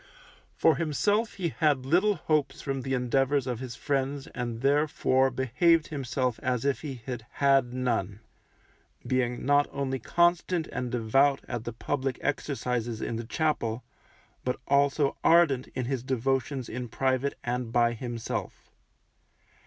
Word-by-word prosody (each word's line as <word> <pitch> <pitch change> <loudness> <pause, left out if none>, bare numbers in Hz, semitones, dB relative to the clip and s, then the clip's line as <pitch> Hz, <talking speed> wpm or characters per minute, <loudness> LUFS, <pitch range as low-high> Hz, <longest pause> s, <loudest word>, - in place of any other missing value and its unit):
For 160 - +4
himself 205 +8 +1
he 180 -4 -1
had 145 -5 +1
little 185 +9 +3
hopes 155 -2 0
from 135 -1 -3
the 135 +1 -1
endeavours 135 +2 +1
of 125 -3 -3
his 125 -2 -6
friends 140 0 -1
and 120 -2 -5
therefore 140 -2 +2
behaved 130 +6 +2
himself 130 -4 -2
as 125 -1 -1
if 140 -1 +1
he 135 -6 -7
had 120 -3 -6
had 135 -3 +3
none, 120 -6 -1 0.9
being 125 -2 -1
not 145 +1 +4
only 135 -1 -2
constant 175 +4 +2
and 125 -1 -3
devout 135 +4 +2
at 120 -1 -4
the 120 - -4
public 135 +2 -2
exercises 125 -5 -2
in 115 - -3
the 115 - -5
chapel, 125 -4 -1 0.6
but 125 +1 -2
also 140 0 +2
ardent 165 -7 +4
in 130 -1 -2
his 130 -1 -2
devotions 130 +1 -1
in 125 +1 -5
private 130 +3 0
and 120 -1 -2
by 120 0 +3
himself. 120 -1 -5
130 Hz, 140 wpm, -28 LUFS, 125-145 Hz, 0.9 s, For